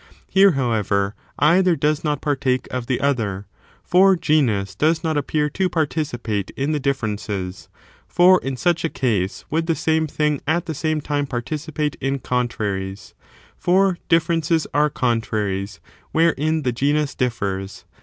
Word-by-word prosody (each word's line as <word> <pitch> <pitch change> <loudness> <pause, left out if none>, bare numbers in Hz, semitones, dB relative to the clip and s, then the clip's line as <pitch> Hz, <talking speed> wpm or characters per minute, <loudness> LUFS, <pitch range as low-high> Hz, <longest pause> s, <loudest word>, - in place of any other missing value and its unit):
Here, 195 -1 +5
however, 105 -6 0 0.2
either 175 +4 +4
does 150 -1 0
not 150 -3 -1
partake 135 -3 0
of 125 -2 -4
the 130 - 0
other, 110 -8 -1 0.4
for 190 +2 +5
genus 115 - +1
does 160 - +1
not 160 -1 0
appear 150 +1 0
to 190 -1 0
participate 130 - -2
in 140 +3 0
the 150 - 0
difierences; 105 -8 -3 0.4
for 180 +1 +5
in 135 -1 -4
such 175 +3 +1
a 165 - 0
case 105 -10 -1
would 165 +2 0
the 165 - +2
same 160 0 +1
thing 150 -1 0
at 165 +3 +1
the 160 - -3
same 155 +1 -1
time 145 0 -1
participate 150 +4 -3
in 135 +1 0
contra 120 -5 -1
ries, 95 +1 -7 0.4
for 185 0 +2
differences 165 -1 +2
are 150 +1 +3
contraries 105 - -2 0.3
wherein 160 -1 +2
the 125 - +1
genus 145 +3 0
differs. 100 -7 -3
145 Hz, 145 wpm, -21 LUFS, 115-160 Hz, 0.4 s, Here